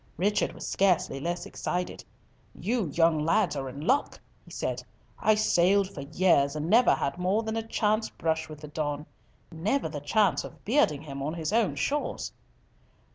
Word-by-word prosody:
Richard 205 +5 +1
was - - -8
scarcely 180 -7 +1
less 175 +4 -3
excited. 180 0 -3 0.6
"You 220 +2 0
young 165 +1 +3
lads 165 +4 +2
are 135 -2 -3
in 140 +3 -8
luck," 285 - +1 0.2
he - - -17
said. - - -3 0.4
"I 215 - +4
sailed 195 -1 +3
for 140 - -6
years 145 -1 +2
and 155 +1 -3
never 235 +6 +5
had 140 +6 -2
more 190 +5 +1
than 220 0 -3
a 225 - 0
chance 220 0 0
brush 160 -1 -2
with 150 -1 -10
the 150 - -8
Don; 150 0 -3 0.5
never 195 +11 0
the 150 -2 -6
chance 195 +6 +2
of - - -12
bearding 205 - +2
him 140 -2 -7
on 150 +4 -2
his 165 +4 -3
own 230 -2 +2
shores!" 295 +1 -2
175 Hz, 175 wpm, -28 LUFS, 150-210 Hz, 0.6 s, never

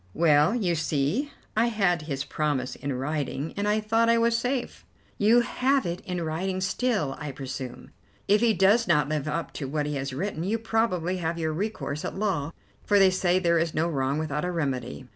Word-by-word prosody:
"Well, 155 +4 +4
you 190 -8 +1
see, 160 - 0 0.2
I 225 +2 +3
had 195 -7 +1
his 140 -3 -3
promise 145 -4 -1
in 140 - -4
writing, 145 +2 -3
and 200 +1 -1
I 210 +1 +2
thought 225 +2 +2
I 230 - +5
was 230 0 +3
safe." 245 +2 -2 0.4
"You 225 +4 +5
have 265 +3 +1
it 175 +1 -3
in 180 -2 -2
writing 185 +4 -2
still, 190 - 0
I 150 -2 -4
presume. 130 -1 -7 0.4
If 205 +2 +4
he 235 -1 +4
does 200 +6 +4
not 150 -1 +3
live 155 -1 -2
up 165 +2 -3
to 140 - -4
what 150 +2 -1
he 150 - -2
has 135 0 -3
written, 165 +4 -3
you 210 +5 0
probably 220 -6 0
have 165 -1 -2
your 160 -1 -1
recourse 175 -5 -3
at - - -4
law, 175 -8 -1 0.3
for 205 - +3
they 195 -1 +6
say 180 -1 +2
there 170 -2 +2
is 165 -1 -1
no 160 +2 +2
wrong 140 -3 0
without 150 -1 -2
a 180 - -1
remedy." 135 -6 -3
170 Hz, 200 wpm, -26 LUFS, 150-210 Hz, 0.4 s, they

